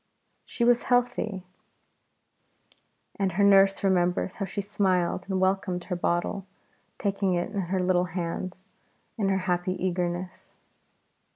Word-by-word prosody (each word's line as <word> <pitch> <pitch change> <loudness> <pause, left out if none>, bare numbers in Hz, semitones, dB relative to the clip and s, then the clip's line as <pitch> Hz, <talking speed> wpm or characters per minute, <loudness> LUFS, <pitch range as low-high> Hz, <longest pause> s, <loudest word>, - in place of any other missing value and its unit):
She 235 - -3
was 240 0 +4
a - - -11
healthy 245 -1 +2
baby, 190 -3 -7 1.8
and 190 -2 0
her 200 +3 +2
nurse 195 0 +5
remembers 180 -1 +1
how 195 - -2
she 195 - -5
smiled 190 -2 0
and 190 -1 0
welcomed 185 -1 0
her 180 - -3
bottle, 175 +3 -1 0.5
taking 195 -2 0
it 175 +3 -2
in 200 -2 -1
her 190 0 0
little 180 -1 +2
hands 180 +2 -5 0.5
in 200 -2 +1
her 195 - +2
happy 180 +1 0
eagerness. 180 0 -3
190 Hz, 135 wpm, -27 LUFS, 180-195 Hz, 1.8 s, nurse